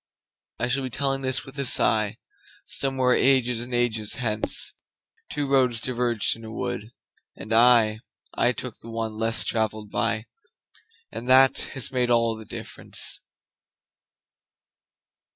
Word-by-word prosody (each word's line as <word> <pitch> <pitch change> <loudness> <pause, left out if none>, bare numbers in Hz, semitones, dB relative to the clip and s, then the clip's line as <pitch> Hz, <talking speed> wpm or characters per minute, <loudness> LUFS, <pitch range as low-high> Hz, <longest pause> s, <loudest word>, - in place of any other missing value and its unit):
I 120 - 0
shall 130 +2 +1
be 130 - -4
telling 135 +2 -1
this 130 +2 0
with 135 +1 -10
a 110 -5 +2 0.5
sighSomewhere 130 -2 +1
ages 125 -3 +2
and 120 +1 -8
ages 115 -3 0
hence:Two 120 +4 -3
roads 130 -4 +2
diverged 120 -3 0
in 115 - -14
a 110 - -9
wood, 110 -1 -5 0.5
and 110 - -6
I—I 115 -2 +2
took - - -6
the 115 - -11
one 115 -1 -4
less 115 0 +1
traveled 110 -2 -2
by, 115 -1 -1 0.9
And 115 +3 -7
that 130 +1 +6 0.2
has 135 - +3
made 125 -2 0
all 115 -1 +2
the 110 0 -11
difference. - - 0
120 Hz, 125 wpm, -24 LUFS, 110-130 Hz, 0.9 s, that